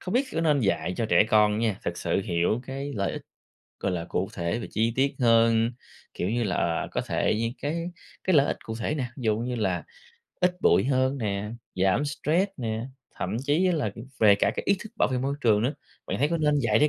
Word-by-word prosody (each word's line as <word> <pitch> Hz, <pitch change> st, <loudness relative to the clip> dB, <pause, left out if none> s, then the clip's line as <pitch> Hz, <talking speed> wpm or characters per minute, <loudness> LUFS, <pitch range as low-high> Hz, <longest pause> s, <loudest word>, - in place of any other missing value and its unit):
không 185 Hz, -, -4 dB
biết 265 Hz, +3 st, +3 dB
có 165 Hz, -, 0 dB
nên 150 Hz, -4 st, +3 dB
dạy 90 Hz, -4 st, 0 dB
cho 115 Hz, -, 0 dB
trẻ -, -, +5 dB
con 105 Hz, -1 st, +5 dB
á 105 Hz, -, -1 dB
nha, 110 Hz, -3 st, 0 dB
thực 85 Hz, 0 st, -2 dB
sự -, -, 0 dB
hiểu 90 Hz, +4 st, 0 dB
cái 135 Hz, +2 st, -5 dB
lợi 100 Hz, -3 st, -1 dB
ích, -, -, -6 dB, 0.6 s
gọi 95 Hz, -, -1 dB
là, 85 Hz, -2 st, -3 dB
cụ 95 Hz, +2 st, -1 dB
thể 85 Hz, +5 st, -2 dB
và -, -, -5 dB
chi 115 Hz, +1 st, +1 dB
tiết 135 Hz, +1 st, +1 dB
hơn, 115 Hz, -1 st, +4 dB, 0.4 s
kiểu 90 Hz, -, -2 dB
như 120 Hz, +1 st, 0 dB
là, 95 Hz, -4 st, -1 dB
ờ, 85 Hz, -1 st, 0 dB
có -, -, -1 dB
thể -, -, 0 dB
những 115 Hz, +1 st, 0 dB
cái 165 Hz, +4 st, -2 dB, 0.3 s
cái 185 Hz, -3 st, +2 dB
lợi 140 Hz, -1 st, +6 dB
ích -, -, -1 dB
cụ 110 Hz, -, -4 dB
thể 150 Hz, -, -1 dB
nè, 135 Hz, -, -1 dB
ví -, -, -7 dB
dụ 110 Hz, -1 st, +2 dB
như 125 Hz, +2 st, -2 dB
là, 95 Hz, -7 st, -1 dB, 0.6 s
ít 180 Hz, 0 st, +2 dB
bụi -, -, +4 dB
hơn 130 Hz, 0 st, +1 dB
nè, 105 Hz, -2 st, -2 dB, 0.2 s
giảm 95 Hz, +9 st, +2 dB
stress 160 Hz, +6 st, 0 dB
nè, 115 Hz, -2 st, -3 dB, 0.3 s
thậm -, -, -3 dB
chí 170 Hz, +6 st, +3 dB
là 120 Hz, -, 0 dB, 0.3 s
về 105 Hz, -2 st, +7 dB
cả 100 Hz, -, +2 dB
cái -, -, -1 dB
ý 200 Hz, -, +4 dB
thức 220 Hz, 0 st, -9 dB
bảo -, -, +3 dB
vệ 125 Hz, -, +1 dB
môi 135 Hz, +2 st, -1 dB
trường 110 Hz, -3 st, +3 dB
nữa, 130 Hz, -, +1 dB, 0.3 s
bạn -, -, -2 dB
thấy 145 Hz, -, +2 dB
có 170 Hz, -, 0 dB
nên 150 Hz, -1 st, +2 dB
dạy 110 Hz, -3 st, +3 dB
trẻ 150 Hz, -, +5 dB
115 Hz, 240 wpm, -26 LUFS, 105-145 Hz, 0.6 s, về